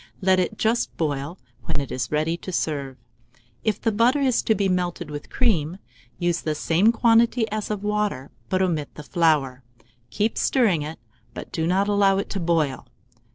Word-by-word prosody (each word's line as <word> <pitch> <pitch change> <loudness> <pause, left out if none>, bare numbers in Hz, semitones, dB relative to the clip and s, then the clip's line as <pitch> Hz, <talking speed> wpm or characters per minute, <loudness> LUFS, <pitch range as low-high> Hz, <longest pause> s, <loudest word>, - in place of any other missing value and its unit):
Let 185 -1 +3
it 185 +4 -1
just 225 +2 0
boil, 145 +1 -2 0.3
when - - -1
it 140 - -5
is 120 -2 -3
ready 155 +2 +1
to 180 +2 -7
serve. 140 -6 -2 0.7
If 215 -3 0
the 225 - +1
butter 235 +7 +3
is 260 -4 +2
to 220 - +2
be 200 -1 +1
melted 180 -4 -2
with 145 0 -7
cream, 180 - +1 0.4
use 175 -1 0
the 155 -1 -2
same 175 +8 +3
quantity 230 0 +3
as 215 -1 -3
of 210 -1 -3
water, 210 -10 -1 0.2
but 185 0 +2
omit 160 -6 -2
the 150 - -8
flour; 150 -6 +1 0.5
keep 215 +2 -1
stirring 215 - +2
it, 155 +2 -6 0.4
but - - -8
do 160 -1 -1
not 190 +3 +2
allow 200 -1 +3
it 200 - -3
to 195 - -2
boil. 160 -8 0
180 Hz, 180 wpm, -24 LUFS, 155-210 Hz, 0.7 s, Let